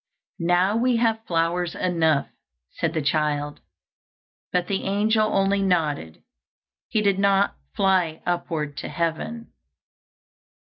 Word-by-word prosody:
"Now 175 +4 +2
we 245 +1 +2
have 225 -1 +1
flowers 170 +1 0
enough," 160 -5 +1 0.4
said - - -2
the 155 - 0
child; 145 -1 0 0.9
but 180 -1 +1
the 195 0 -2
angel 215 +2 +2
only 195 +1 +2
nodded, 155 - -1 0.6
he 215 - 0
did 200 -1 +2
not 200 0 +3 0.2
fly 185 -5 +1
upward 165 -4 -2
to - - -5
heaven. 170 +8 -3
180 Hz, 115 wpm, -24 LUFS, 160-200 Hz, 0.9 s, not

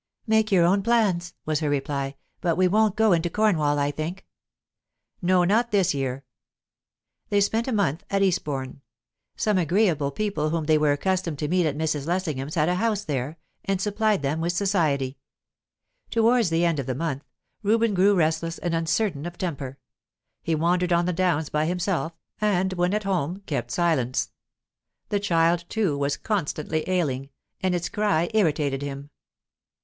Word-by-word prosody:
"Make 220 -1 +2
your 180 -3 +5
own 195 +3 +3
plans," 195 -6 +1
was 155 -1 0
her 155 -2 -1
reply. 140 -1 -2 0.3
"But 170 -2 +1
we 185 0 +4
won't 215 +1 +2
go 220 -1 +3
into 170 0 +1
Cornwall, 165 -8 +2
I 145 0 +1
think." 160 +6 -5 1.0
"No, 180 0 +3
not 225 +7 +2
this 195 -7 +2
year." 135 -1 -3 1.0
They 205 - +3
spent 220 +4 +1
a - - -1
month 185 - 0
at 195 0 +2
Eastbourne. 140 -8 -1 0.5
Some 210 -3 +1
agreeable 170 -4 +2
people 155 -2 -1
whom 165 0 -1
they 155 0 +4
were 150 -1 +3
accustomed 175 +1 -1
to 150 - -2
meet 175 +1 +2
at 145 -1 -2
Mrs. 155 -2 -1
Lessingham's 155 -6 -2
had 155 -2 +2
a 180 - +2
house 215 -3 0
there, 145 0 -3 0.3
and 195 -1 -1
supplied 210 -3 +1
them 150 +4 -1
with 170 +1 0
society. 155 -9 0 0.9
Towards 230 -2 +3
the 165 +1 +2
end 165 -4 +1
of 135 - -4
the 130 - -1
month, 145 -1 -3 0.4
Reuben 225 +1 +2
grew 195 +2 +4
restless 165 0 0
and 175 - -3
uncertain 165 -1 0
of 175 0 -9
temper; 140 -7 -4 0.6
he 165 - 0
wandered 175 +3 +1
on 170 0 +3
the 180 - 0
downs 170 -4 +1
by 150 +1 0
himself, 180 -1 -1 0.3
and 190 -3 +1
when 180 +2 +1
at 210 - -1
home 185 -1 -1
kept 120 -5 -3
silence. 135 -5 0 0.8
The 205 - +1
child, 170 -3 +2
too, 205 -10 0
was 140 0 -1
constantly 155 -5 -2
ailing, 140 -7 -1 0.3
and 185 -1 +1
its 175 0 -2
cry 205 -4 0
irritated 150 -9 +1
him. 140 0 -6
170 Hz, 165 wpm, -25 LUFS, 150-195 Hz, 1.0 s, your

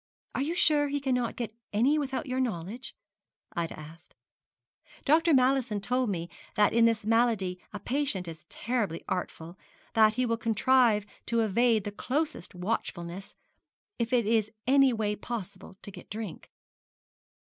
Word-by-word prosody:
'Are - - -1
you 315 +5 -1
sure 295 -4 +4
he 285 0 -1
cannot 250 -4 0
get 230 -3 -4 0.2
any 260 +9 +3
without 275 0 -2
your 255 -1 -2
knowledge?' 225 0 -3 0.6
Ida 170 -3 -3
asked. 160 +2 -13 0.9
'Dr. 325 +3 +4
Mallison 260 -5 +3
told 250 +3 0
me 170 -3 -2 0.3
that 210 0 +4
in 230 0 +5
this 230 -2 +2
malady 220 -5 +2
a 210 - -6
patient 240 -5 -1
is 160 -1 -9
terribly 225 -8 -2
artful 175 -1 -4 0.3
that 215 -1 +5
he 255 +1 +1
will 230 -1 0
contrive 225 -1 +3 0.2
to 230 -1 +2
evade 225 +1 +3
the 205 - -4
closest 260 - -3
watchfulness, 180 -1 -4 0.6
if 235 +1 -1
it 240 -3 +3
is 220 -1 +2 0.2
any 270 +1 +5
way 215 -3 -1
possible 200 -4 -7
to 205 - -8
get - - -12
drink.' 210 -3 -6
225 Hz, 150 wpm, -29 LUFS, 195-255 Hz, 0.9 s, in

